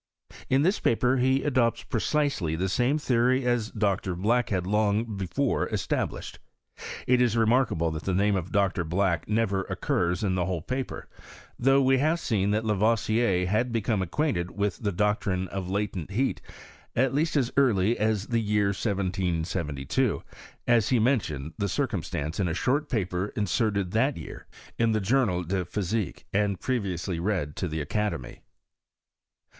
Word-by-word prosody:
In 135 +2 +3
this 190 +5 +2
paper 125 +3 +2
he 130 +2 +2
adopts 125 -5 +1
precisely 120 - 0
the 95 +3 -1
same 125 +9 +2
theory 130 -2 +2
as 120 -3 +1
Dr. 100 -4 -1
Black 115 +7 +1
had 90 -3 -1
long 105 +2 +1
before 100 +9 -1
established. - - -3 0.7
It 125 0 +3
is 120 -2 +2
remarkable 115 -8 +2
that 80 -1 -4
the 95 - 0
name 100 +2 +2
of 95 -1 -3
Dr. 100 -3 +1
Black 90 +1 0
never 105 -3 +1
occurs 90 +4 -1
in 95 -3 +1
the 90 -1 0
whole 90 -4 -2
paper, 130 +5 -4 0.5
though 135 +2 +4
we 130 0 +4
have 155 +4 +2
seen 100 - 0
that 105 +2 0
Lavoisier 110 -2 +2
had 110 +6 0
become 110 -3 0
acquainted 95 - -1
with 100 -1 -2
the 105 -2 -2
doctrine 95 -1 0
of 95 -1 -4
latent 100 -4 -2
heat, 125 +7 -1 0.5
at 130 +1 +2
least 155 +3 0
as 130 -3 0
early 115 -5 +3
as 105 -2 +1
the 115 -1 0
year 105 -1 +1
1772, 90 - -1 0.4
as 115 -3 +3
he 125 - +3
mentioned 90 - 0
the 100 -1 0
circumstance 80 0 -2
in 95 - +1
a 80 - -2
short 145 - 0
paper 95 -4 -1
inserted 100 -2 0
that 130 +6 +1
year - - -9 0.3
in 115 -1 +3
the 110 - +2
Journal 105 -4 +1
de 90 +2 -1
Physique, 100 +3 -3
and 100 -1 +1
previously 95 -8 -2
read 85 -6 -1
to 90 - -2
the 80 -1 -3
academy. 90 -4 -3
105 Hz, 155 wpm, -27 LUFS, 90-120 Hz, 0.7 s, though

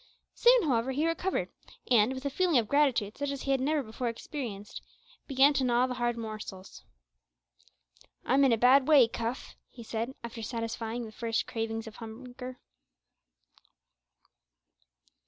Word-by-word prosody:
Soon, 485 -1 +5
however, 260 -3 +1
he 295 +4 0
recovered, 345 +3 -1 0.4
and, 235 +1 +5
with 260 +1 -7
a 280 - -1
feeling 350 -1 +2
of 230 -3 +2
gratitude 255 -7 +2
such 285 0 -1
as 280 -1 -4
he 275 - -1
had 270 - +2
never 295 +1 +1
before 230 +2 -4
experienced, 230 -4 -6 0.5
began 275 +1 +5
to 270 -1 0
gnaw 245 0 +3
the 255 - -3
hard 240 -1 -1
morsels. 215 -4 -8 1.4
"I'm 270 +3 +3
in 270 - +5
a 230 - +3
bad 260 +4 +5
way, 285 -6 +7
Cuff," 230 +2 -5
he 235 - -12
said, 230 +4 -4
after 230 0 -7
satisfying 230 +1 -4
the 220 - -9
first 225 +1 -2
cravings 225 0 -3
of 220 -1 -10
hunger. 250 +2 -9
245 Hz, 150 wpm, -29 LUFS, 225-275 Hz, 1.4 s, way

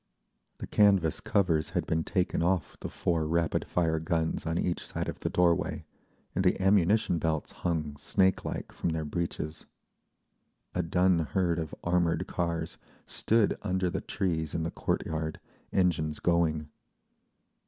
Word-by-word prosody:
The - - -6
canvas 100 -6 +3
covers 85 -6 +1
had - - 0
been 80 0 0
taken 90 -1 0
off 85 -3 0
the - - -5
four 80 -3 0
rapid 85 0 +1
fire 80 -2 +1
guns 80 -1 -1
on 85 +1 0
each 85 0 -1
side - - -4
of - - -5
the - - -2
doorway, 85 -2 +1 0.5
and 95 - 0
the 90 - +3
ammunition 95 -1 +3
belts 80 -2 -1
hung 75 -4 -2
snakelike 95 +5 0
from - - -2
their 80 -1 -2
breeches. 80 -1 -4 1.1
A - - +1
dun 90 +1 +3
herd 85 +1 0
of 80 -2 -4
armoured 85 0 +1
cars 85 -2 -3 0.3
stood 110 -2 +2
under 95 -2 0
the - - -2
trees 80 -6 -2
in 80 - -1
the 85 - -2
court - - -1
yard, 80 0 -3 0.3
engines 80 -5 +1
going. 80 -3 +1
85 Hz, 145 wpm, -29 LUFS, 80-90 Hz, 1.1 s, canvas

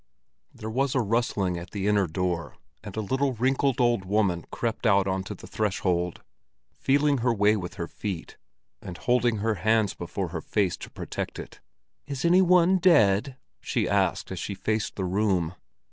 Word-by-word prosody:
There 110 - -8
was 135 +3 0
a - - +3
rustling 100 -5 0
at 85 - -9
the 100 -2 -4
inner 100 -2 +3
door, 85 0 -3 0.3
and 105 0 -8
a - - 0
little, 130 +5 0
wrinkled 130 +2 +1
old 120 -5 +2
woman 95 -3 0
crept 115 0 -2
out 100 -2 +4
onto 95 0 -3
the - - -12
threshold, 90 -4 -1 0.5
feeling 140 0 +2
her 120 +1 +2
way 105 -1 +3
with 90 -2 -5
her 85 -4 -4
feet, 95 -4 -6 0.5
and 90 -2 -8
holding 120 -1 +2
her 110 +2 0
hands 110 -1 +2
before 90 +1 -4
her 80 -1 -5
face 100 -1 0
to - - -9
protect - - -5
it. - - -9 0.5
"Is 140 +1 -3
any 180 +2 +6
one 180 0 +5
dead?" 130 - +4 0.2
she - - -1
asked - - 0
as - - -4
she 100 - -4
faced 110 +2 -2
the 95 - -2
room. 90 -3 +1
105 Hz, 175 wpm, -26 LUFS, 95-125 Hz, 0.5 s, any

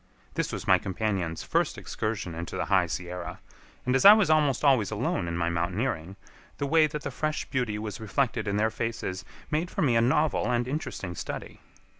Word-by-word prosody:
This - - -1
was - - -5
my - - +6
companions' 95 -4 -2
first - - 0
excursion 110 -6 -3
into 85 +3 -5
the - - -1
High 95 -3 +3
Sierra, 90 +2 -5 0.5
and 125 +1 +2
as 135 - +3
I 200 +1 +12
was 215 -6 +3
almost 150 -4 +3
always 130 -8 +4
alone 105 -4 -1
in 85 0 -2
my 85 0 0
mountaineering, 90 +1 -2 0.4
the 140 - -1
way 155 +2 +4
that 150 -2 -6
the - - -3
fresh 155 0 -2
beauty 125 -6 -1
was 105 0 -5
reflected 115 +2 -1
in 100 0 0
their 110 +1 +2
faces 110 -5 -3 0.3
made 160 +3 0
for - - -1
me 125 -5 +3
a 115 - +5
novel 130 -1 +2
and 120 0 +1
interesting 130 - -4
study. - - -6
110 Hz, 195 wpm, -28 LUFS, 95-140 Hz, 0.5 s, I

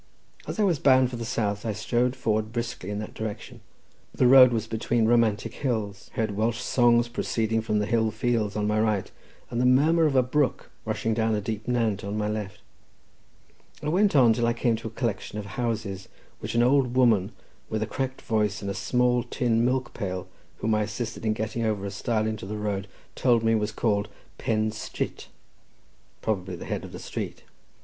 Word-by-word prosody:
As - - -5
I - - +4
was 175 -8 +2
bound 130 -2 +4
for - - -4
the 115 - -4
south, 105 -3 -1
I 110 -2 -1
strode 120 +4 0
forward 110 -3 -1
briskly 115 -5 -4
in 105 - -3
that 105 0 -6
direction. 110 -2 -6 0.5
The - - +3
road 130 0 +9
was 115 -2 -1
between 115 +1 0
romantic 115 -1 +2
hills; 110 -8 -3
heard 110 -2 0
Welsh 110 +2 0
songs 120 -1 +3
proceeding 115 -1 -1
from 105 -1 -1
the 105 - +1
hill 110 0 +2
fields 110 -2 -1
on 105 -1 0
my 105 +1 +1
right, 110 -3 0 0.4
and 120 0 0
the - - +2
murmur 155 +6 +4
of 140 - -1
a 130 - +5
brook 140 +2 0
rushing 110 +1 -1
down 110 0 +1
a - - 0
deep 110 +1 -5
nant 115 -5 0
on 100 +1 -3
my 105 -1 0
left. 105 -1 -4 1.2
I 150 - -1
went 195 +2 +3
on 120 -5 +6
till 120 0 0
I 120 - +2
came 120 -1 +1
to 115 - -6
a - - -4
collection 110 -2 -3
of 105 - -4
houses 100 -3 -3 0.3
which - - -5
an 120 - +4
old 130 -1 +3
woman, 115 -6 +4 0.4
with 110 0 -1
a - - -1
cracked 130 +3 -4
voice 105 -2 0
and 100 - -2
a - - -3
small 125 +3 +1
tin 115 -1 0
milk 125 0 0
pail, 95 -4 -4 0.3
whom 110 - +1
I 105 - +2
assisted 110 +1 -4
in 110 - +3
getting 110 +2 -3
over 105 -3 -1
a 100 - -4
stile 110 +2 -1
into 110 -3 -3
the 105 +1 -4
road, 105 -1 -2 0.3
told 120 -3 +2
me 115 0 +3
was 105 -1 0
called 105 -1 0 0.3
Pen 110 -1 0
Strit—probably 100 -2 -7
the - - -8
head - - -3
of - - -9
the - - -7
street. - - -6
110 Hz, 200 wpm, -26 LUFS, 105-120 Hz, 1.2 s, road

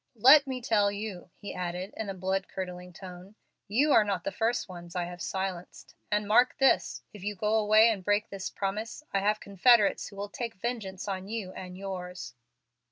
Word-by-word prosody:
"Let 275 +6 +8
me 255 -2 -4
tell 205 -3 +3
you," 200 -3 -6
he 205 - -7
added, 180 +2 -4
in 220 -2 -4
a 195 - -4
blood 190 +1 -1
curdling 180 -1 -6
tone, 185 +2 -11 0.3
"you 265 +9 +2
are 220 - +7
not 200 -2 -2
the 295 - -2
first 235 -1 0
ones 175 -2 -10
I 180 - 0
have 175 0 -7
silenced. 190 -1 -5 0.2
And 210 0 +1
mark 245 +4 +4
this 270 -2 +2
if 205 -3 -11
you 205 +1 -3
go 210 +3 0
away 215 +1 +6
and 210 -5 0
break 205 +2 +1
this 195 0 -4
promise, 210 +7 -4
I 195 - +3
have 210 +2 +1
confederates 205 +2 +3
who 200 - -12
will 200 +1 -5
take 230 +1 -5
vengeance 205 -4 -4
on 190 -1 -4
you 210 -4 -4
and 180 -1 -8
yours." 185 -2 -6
200 Hz, 195 wpm, -29 LUFS, 185-220 Hz, 0.3 s, Let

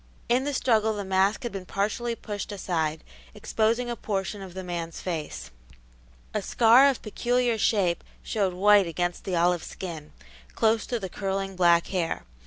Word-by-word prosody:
In 250 +3 +2
the 290 - -1
struggle 220 -4 +2
the 205 -1 -4
mask 190 +4 +2
had 240 - -3
been 190 -2 -7
partially 225 +4 -1
pushed 205 -2 -6
aside, 160 -5 -2 0.3
exposing 230 +3 0
a 240 - -2
portion 200 -2 -3
of 185 -2 -9
the 190 - -5
man's 170 -2 -5
face. 150 - -5 0.8
A 215 - 0
scar 235 +6 +6
of 270 - -3
peculiar 240 +1 0
shape 190 -6 +2 0.2
showed 195 -4 -1
white 200 0 +5
against 175 +1 -2
the 185 - -1
olive 175 0 +2
skin, 165 -5 -7 0.4
close 225 0 +2
to 240 - -2
the 195 - -4
curling 195 0 -3
black 170 -2 +4
hair. 175 -4 -2
195 Hz, 165 wpm, -26 LUFS, 175-220 Hz, 0.8 s, scar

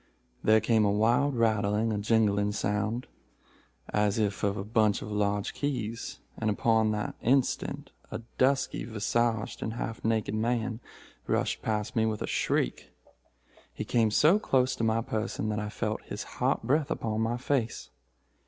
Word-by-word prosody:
There 110 0 +5
came 110 0 +3
a 105 - +3
wild 120 +7 +2
rattling 110 -1 +2
or 105 - -1
jingling 105 -1 +2
sound, 105 +4 -1 0.9
as 105 0 +2
if 105 -2 0
of 100 0 +1
a 95 - -3
bunch 105 -1 +2
of 105 - -7
large 105 -1 0
keys, 115 -6 -3 0.2
and 110 - 0
upon 110 +1 +2
the 105 -1 -2
instant 130 +2 0 0.2
a - - -6 0.2
dusky 135 +1 +2
visaged 115 0 -1
and 110 - -3
half 115 -1 -5
naked 110 -2 0
man 115 +1 -1 0.5
rushed - - 0
past 105 +3 -2
me 110 -1 +3
with 110 -1 -2
a - - -1
shriek. - - -1 0.8
He - - -5
came 115 -2 +2
so 155 - +5
close 130 -9 +2
to - - -2
my 115 0 +2
person 110 -1 -2
that 105 -1 -1
I 105 0 -3
felt 110 0 -3
his - - -6
hot - - -1
breath 145 +2 +2
upon 110 -1 -1
my 115 +2 0
face. 125 -3 -2
110 Hz, 160 wpm, -29 LUFS, 105-115 Hz, 0.9 s, There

